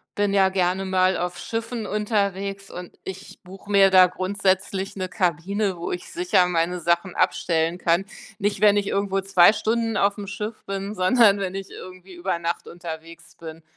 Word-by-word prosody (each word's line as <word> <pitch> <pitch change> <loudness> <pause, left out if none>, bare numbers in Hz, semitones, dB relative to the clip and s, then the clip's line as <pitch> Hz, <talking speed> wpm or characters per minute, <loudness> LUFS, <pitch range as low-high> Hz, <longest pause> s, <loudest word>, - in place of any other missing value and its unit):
Bin 205 -1 +1
ja 190 -1 +4
gerne 185 0 0
mal 185 0 +2
auf 175 0 -4
Schiffen 225 +3 -4
unterwegs 200 -2 -2
und 180 0 -9
ich 190 +1 -9
buche 195 +2 -12
mir 195 -1 +6
da 185 -1 +7
grundsätzlich 190 +1 -1
'ne 185 -1 -4
Kabine, 190 +2 -1
wo 170 - -5
ich 180 - -6
sicher 345 - +2
meine 175 0 -1
Sachen 170 +2 0
abstellen 165 +1 0
kann. 170 +3 +1 0.3
Nicht, 205 -1 -1
wenn 205 -1 +5
ich 200 -1 0
irgendwo 195 -1 -1
2 190 0 +5
Stunden 225 +1 -1
auf'm 200 0 0
Schiff 210 +2 -6
bin, 195 +1 -4
sondern 205 +1 +4
wenn 190 -1 -3
ich 195 0 -6
irgendwie 185 0 -11
über 175 0 -2
Nacht 170 0 -3
unterwegs 165 -1 -10
bin. 165 0 -10
190 Hz, 170 wpm, -23 LUFS, 180-200 Hz, 0.3 s, da